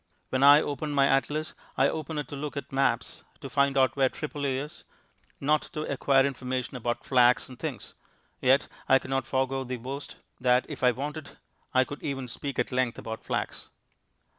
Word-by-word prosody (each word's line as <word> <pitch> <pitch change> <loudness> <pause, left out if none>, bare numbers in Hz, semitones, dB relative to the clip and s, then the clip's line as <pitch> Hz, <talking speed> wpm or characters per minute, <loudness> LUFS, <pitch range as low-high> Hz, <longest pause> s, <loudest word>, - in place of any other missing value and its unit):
When 130 - 0
I 145 +2 +8
open 145 +1 -3
my 140 -1 +4
atlas 145 +3 +1 0.2
I 135 +1 +5
open 155 +1 -4
it 145 -3 -3
to - - -6
look 145 +1 -5
at 140 - -6
maps 135 0 0 0.2
to - - -8
find 140 0 +2
out 130 -1 +3
where 135 -2 +3
Tripoli 145 -3 -3
is 145 +3 -7 0.6
not 150 +2 +2
to 155 - -3
acquire 135 -1 +3
information 130 -1 -3
about 120 0 -2
flax 125 -1 +4
and 130 -2 -12
things; - - -5 0.5
yet 130 +2 +4 0.2
I 135 - +8
cannot 135 -1 -2
forego 135 0 0
the 130 -1 -4
boast 135 +4 -7 0.2
that 125 0 +3
if - - -7
I 125 - +7
wanted 145 +4 -5 0.3
I 130 - +4
could 145 +2 -8
even 135 -3 -3
speak 135 +3 -5
at - - 0
length 125 -2 0
about 110 0 -6
flax. - - -3
135 Hz, 185 wpm, -28 LUFS, 130-145 Hz, 0.6 s, I